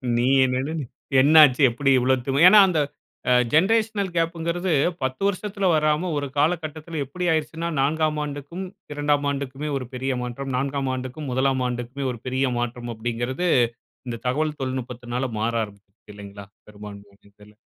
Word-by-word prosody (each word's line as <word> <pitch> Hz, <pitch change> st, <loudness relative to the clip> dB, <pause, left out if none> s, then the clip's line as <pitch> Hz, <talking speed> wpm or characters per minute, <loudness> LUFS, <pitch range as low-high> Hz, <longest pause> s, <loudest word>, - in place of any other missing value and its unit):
நீ 120 Hz, +1 st, +1 dB, 0.2 s
என்னனனு 135 Hz, +5 st, -2 dB, 0.4 s
என்னாச்சு 150 Hz, -1 st, +6 dB
எப்டி 135 Hz, +4 st, 0 dB
இவ்ளோ 130 Hz, +2 st, +3 dB
திமு 140 Hz, +5 st, +4 dB
ஏன்னா, 210 Hz, +3 st, +8 dB
அந்த 175 Hz, -4 st, +1 dB, 0.5 s
அ -, -, +6 dB, 0.2 s
ஜென்ரேஷனல் 205 Hz, +2 st, +2 dB
கேப்புங்கிறது, 170 Hz, +2 st, -1 dB, 0.3 s
10 130 Hz, +3 st, -3 dB
வருஷத்துல 200 Hz, 0 st, -2 dB
வராம, 155 Hz, +3 st, +1 dB
ஒரு 145 Hz, 0 st, -2 dB
காலகட்டத்தில 155 Hz, 0 st, -1 dB
எப்டி 180 Hz, +7 st, -5 dB
ஆயிடுச்சுன்னா, 160 Hz, +1 st, -2 dB
4ஆம் 155 Hz, +2 st, +1 dB
ஆண்டுக்கும் 145 Hz, +6 st, -6 dB, 0.3 s
2ஆம் 145 Hz, 0 st, 0 dB
ஆண்டுக்குமே 140 Hz, +1 st, -4 dB
ஒரு 130 Hz, -, -5 dB
பெரிய 130 Hz, +1 st, -2 dB
மாற்றம். 125 Hz, +3 st, -5 dB
4ஆம் 135 Hz, 0 st, -1 dB
ஆண்டுக்கும் 130 Hz, +3 st, -5 dB
1ஆம் 130 Hz, 0 st, +1 dB
ஆண்டுக்குமே 125 Hz, +3 st, -4 dB
ஒரு 120 Hz, -, -8 dB
பெரிய 130 Hz, +1 st, 0 dB
மாற்றம் 120 Hz, 0 st, -4 dB
அப்படிங்கிறது, 120 Hz, +8 st, -3 dB, 0.6 s
இந்த 115 Hz, -1 st, -4 dB
தகவல் 150 Hz, +4 st, -1 dB
தொழில்நுட்பத்தினால 125 Hz, -1 st, -3 dB
மாற 115 Hz, +2 st, 0 dB
ஆரம்பிக்குது 100 Hz, -1 st, -10 dB, 0.3 s
இல்லைங்களா? 100 Hz, 0 st, -10 dB, 0.2 s
பெரும்பான்மையான 100 Hz, -1 st, -12 dB
இடத்தில். 105 Hz, +1 st, -19 dB
135 Hz, 140 wpm, -23 LUFS, 125-155 Hz, 0.6 s, ஏன்னா